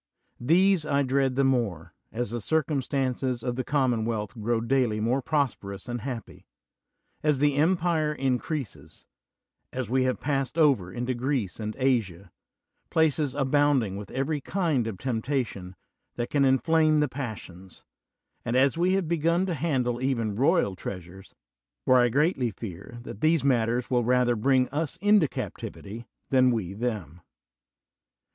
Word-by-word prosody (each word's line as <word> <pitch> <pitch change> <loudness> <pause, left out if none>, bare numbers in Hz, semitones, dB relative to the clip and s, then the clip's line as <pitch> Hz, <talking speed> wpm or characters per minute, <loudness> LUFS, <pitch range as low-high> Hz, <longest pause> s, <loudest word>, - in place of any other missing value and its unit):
These 180 +6 +3
I 140 -1 +1
dread 135 0 +1
the 135 - +2
more, 105 -11 0 0.2
as 120 -1 -3
the 120 -1 -3
circumstances 135 -3 -1
of 125 -1 -2
the 130 - -2
common 130 -6 +1
wealth 110 -3 -3
grow 115 0 -1
daily 115 -2 +1
more 120 +5 +1
prosperous 125 -10 -2
and 120 -1 -4
happy; 125 -3 -7 0.7
as 150 -2 +2
the 145 +1 +2
empire 160 0 +2
increases; 130 - -3 0.7
as 125 -3 -4
we 130 0 +2
have 130 - 0
passed 140 +1 -2
over 135 - +3
into 120 +5 -2
Greece 120 - -2
and 110 0 -4
Asia, 105 -9 0 0.6
places 155 -4 +1
abounding 140 -6 +2
with 100 -1 -7
every 140 +3 -2
kind 155 - 0
of 110 -4 -5
temptation 115 -6 -3 0.4
that 120 0 -4
can 140 -2 +3
inflame 155 +3 +3
the 150 - +2
passions; 105 -9 -8 0.6
and 115 - -2
as 135 +4 +3
we 180 +2 +3
have 190 -3 0
begun 170 +2 +1
to 185 - -2
handle 130 -6 -1
even 115 -5 0
royal 135 - +2
treasures: 90 +1 -8 0.5
for 130 - +5
I 120 0 +4
greatly 140 -1 +1
fear 100 +1 -9
that 105 - -9
these 160 -2 +3
matters 120 -2 +1
will 120 -1 +2
rather 125 0 +2
bring 130 +3 +2
us 150 +1 -3
into 205 -5 +4
captivity 115 -2 -7 0.2
than 130 -1 +5
we 105 -7 -2
them. 100 - -4
130 Hz, 145 wpm, -27 LUFS, 115-145 Hz, 0.7 s, for